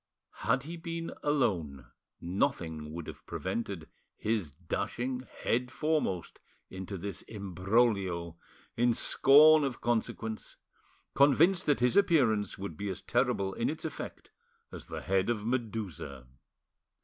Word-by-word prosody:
Had 125 +3 +3
he 165 +4 -6
been 165 0 -5
alone, 90 - 0 0.3
nothing 80 -3 -1
would 85 0 -6
have - - -9
prevented 95 -4 -4 0.3
his 105 -7 -1
dashing 120 - -3 0.2
head 125 +2 +1
foremost 150 - -1 0.3
into 95 +1 -6
this 95 0 -5
imbroglio, 95 -3 0 0.4
in 120 0 +3
scorn 155 +3 +7
of 135 -3 -2
consequence, 110 -2 -2 0.6
convinced 160 +7 +4
that 145 -4 +3
his 125 -1 +3
appearance 125 - +3
would 95 -5 -6
be 100 +3 -3
as 95 - -5
terrible 120 -6 +1
in - - -1
its - - -5
effect - - -7 0.4
as - - -9
the - - -5
head 95 +2 +1
of 110 -3 -1
Medusa. 105 - -3
110 Hz, 125 wpm, -31 LUFS, 95-130 Hz, 0.6 s, scorn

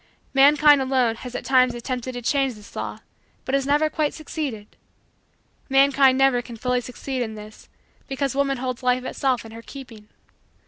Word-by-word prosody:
Mankind, 290 +1 +6
alone, 255 -4 +1
has 250 0 -9
at - - -5
times 255 -2 +3
attempted 250 +1 -4
to 245 0 -6
change 270 -1 +1
this 210 0 -15
law - - -5 0.4
but 260 - -4
has 275 0 +1
never 295 +2 +3
quite 305 -1 -1
succeeded. 285 -9 -6 0.9
Mankind 270 -1 +4
never 270 -2 +3
can 235 -1 -10
fully 250 +2 0
succeed 255 +2 -5
in 220 -2 -4
this 215 0 -12 0.4
because 270 -1 -2
woman 275 -1 +1
holds 255 -1 -4
life 250 0 +1
itself 255 -2 -1
in 225 - -11
her 230 +1 -10
keeping. 230 -5 -12
260 Hz, 170 wpm, -23 LUFS, 240-275 Hz, 0.9 s, Mankind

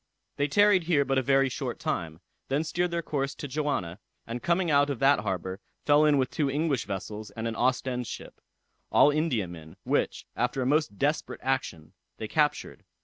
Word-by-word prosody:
They 145 - +1
tarried 200 +2 +4
here 150 -5 +3
but 135 0 +2
a - - +1
very 135 +1 +3
short 130 - -4
time, 80 0 -3 0.3
then 140 +3 0
steered 175 +2 -1
their 170 0 -2
course 140 -3 -2
to 145 - -6
Johanna, 130 - -2 0.3
and 120 +1 -5
coming 175 -1 +1
out 145 0 +4
of 140 - -2
that 135 +1 +4
harbor, 95 -2 -3 0.3
fell 150 +1 +5
in 150 -2 +4
with 130 -2 0
two 145 -3 0
English 145 -2 0
vessels 105 +2 -5
and 115 +3 -5
an 115 - -3
Ostend 125 0 0
ship, - - -9 0.5
all 145 - +6
Indiamen, 95 - -2
which, - - -1
after 125 +2 0
a - - -2
most 145 -6 +1
desperate 145 +3 -1
action, 130 -12 -2 0.2
they - - -5
captured. - - 0
135 Hz, 185 wpm, -28 LUFS, 110-150 Hz, 0.5 s, all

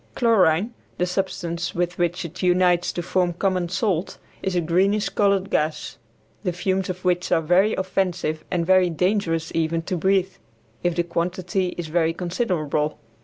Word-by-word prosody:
Chlorine, 210 -3 +3 0.2
the 180 - +1
substance 175 -2 -3
with 175 0 -1
which 175 0 0
it 170 +2 -8
unites 180 -1 +3
to 175 - -4
form 180 0 +1
common 180 -1 0
salt, 185 -2 -1 0.2
is 190 -1 -2
a - - +3
greenish 190 +6 +2
colored 200 -1 +1
gas, 155 +1 -1 0.4
the 180 - 0
fumes 185 +2 -1
of 185 0 -5
which 180 -1 +1
are - - +4
very 180 +6 +3
offensive 185 -4 -1
and 170 -2 0
very 185 0 +4
dangerous 170 -2 0
even 165 0 0
to 185 - -2
breathe, 190 +2 +1 0.4
if 175 -1 0
the 175 - +1
quantity 180 +2 -2
is 175 - -3
very 165 +1 +1
considerable. 170 -6 -1
180 Hz, 160 wpm, -23 LUFS, 170-190 Hz, 0.4 s, are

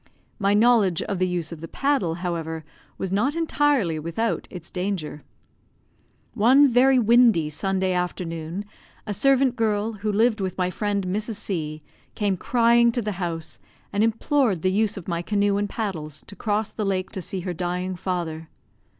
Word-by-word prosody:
My 200 0 +2
knowledge 215 -6 +4
of 195 -3 -3
the 185 - +2
use 175 -3 -3
of 165 -2 -8
the 165 - -6
paddle, 270 - 0
however, 165 -3 -4 0.3
was 190 - -3
not 240 +10 +1
entirely 290 - +1
without 170 +9 -2
its 175 -2 -9
danger. 180 -6 -3 1.1
One 260 +7 +6
very 260 +1 +4
windy 230 -9 +4
Sunday 190 +3 0
afternoon, 175 0 -3 0.4
a 210 - -3
servant 265 +3 +3
girl, 220 -1 0
who 210 0 -2
lived 220 +1 +2
with 185 -1 -3
my 180 -1 0
friend 205 -1 -1
Mrs. 210 +4 -2
C, 155 -6 -4 0.3
came 205 -2 +1
crying 235 +4 +3
to 240 - -1
the 210 - -2
house, 165 -2 -3 0.3
and 205 +1 +2
implored 225 - +1
the 185 - +3
use 210 +1 +1
of 185 - -8
my 170 -2 -1
canoe 200 +1 +1
and 205 0 -1
paddles, 160 -10 -4
to 200 - -11
cross 210 0 -1
the 215 - -4
lake 190 -2 -1
to 190 - -5
see 185 +2 -4
her 180 0 -3
dying 180 +2 -3
father. 170 -3 -4
195 Hz, 165 wpm, -24 LUFS, 175-225 Hz, 1.1 s, One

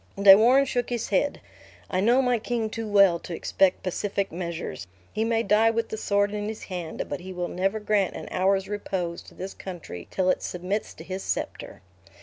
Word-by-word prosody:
De 195 -1 +10
Warenne 250 +6 +5
shook 245 -3 -1
his 240 -2 -2
head; 215 +9 +1 0.5
"I 185 - -1
know 240 +7 +4
my 250 -2 +2
king 225 -1 -2
too 225 0 -4
well 200 -4 +5
to 170 - -6
expect 185 +3 +1
pacific 195 +2 -2
measures. 170 - -5 0.3
He 220 - 0
may 225 0 +1
die 215 +2 +4
with 225 0 -1
the - - -3
sword 205 -1 +1
in 210 0 -3
his 220 0 -6
hand; 175 -4 -5
but 145 - -4
he 185 +1 -8
will 180 -1 -3
never 195 +5 -1
grant 210 -2 +1
an - - -7
hour's 190 +1 +1
repose 190 -4 -3
to - - -16
this 190 +1 -6
country 170 - -8
till 185 -1 +2
it - - -2
submits 185 +4 -3
to 160 - -10
his 185 +2 -5
scepter." - - -4
200 Hz, 200 wpm, -26 LUFS, 185-220 Hz, 0.5 s, De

